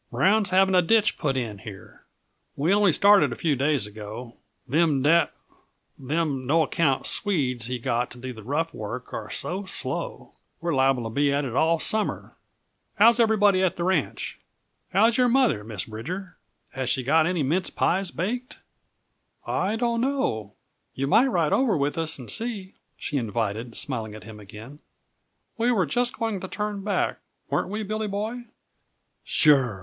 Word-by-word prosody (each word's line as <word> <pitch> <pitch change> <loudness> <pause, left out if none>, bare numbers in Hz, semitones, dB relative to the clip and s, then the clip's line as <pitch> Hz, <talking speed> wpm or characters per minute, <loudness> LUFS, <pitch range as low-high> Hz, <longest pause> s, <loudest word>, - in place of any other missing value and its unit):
Brown's 195 - +2
having 190 +1 +3
a 180 - +6
ditch 210 +4 +3
put 140 -5 0
in 110 -5 -4
here. 100 -4 -12 0.5
We 160 +7 +1
only 205 -2 +4
started 200 +5 +5
a - - -4
few 160 -5 0
days 140 -3 +1
ago; 110 +3 -9 0.3
them 145 -1 +2
da 165 +3 +4 0.7
them 140 -2 -2
no 160 +3 +4
account 145 -3 0
Swedes 130 - +1
he 125 0 -2
got 120 +1 -1
to - - -12
do 130 +1 -6
the 110 - -11
rough 155 +8 -2
work 115 +4 -7
are - - -5
so 195 +3 -2
slow, - - -4 0.3
we're 170 -1 -2
liable 135 -2 +2
to 115 - -5
be 140 +4 +2
at 140 0 0
it 120 -2 -5
all 165 +4 +3
summer. 215 +6 -1 0.6
How's 230 +3 +5
everybody 205 -4 +4
at 185 -2 +1
the 170 - -3
ranch? 175 -5 -1 0.5
How's 225 +5 +3
your 250 -1 +4
mother, 240 - +2
Miss 105 -3 -5
Bridger? 175 - -7 0.4
Has 130 -2 -3
she 130 0 0
got 155 +5 +3
any 175 -4 0
mince 170 +7 0
pies 190 +1 0
baked?" 230 - -4 0.9
"I 200 +4 -1
don't 235 0 0
know 175 - -1 0.4
you 135 - -1
might 230 - +4
ride 170 - +1
over 235 -9 +2
with 145 0 0
us 160 -1 0
and 125 -3 -7
see," 220 -5 -5 0.2
she 145 - -3
invited, 115 0 -3
smiling 110 -6 -3
at 110 - -11
him 110 -1 -11
again. 110 +8 -12 0.8
"We 235 +2 +2
were 195 -7 +2
just 245 0 -1
going 225 -4 -2
to 190 - -6
turn 210 0 -4
back 205 - -1 0.3
weren't - - 0
we, 215 +2 -3
Billy 215 +1 -3
Boy?" 215 +5 -4 0.8
"Sure!" 135 -9 +3
160 Hz, 170 wpm, -25 LUFS, 125-205 Hz, 0.9 s, a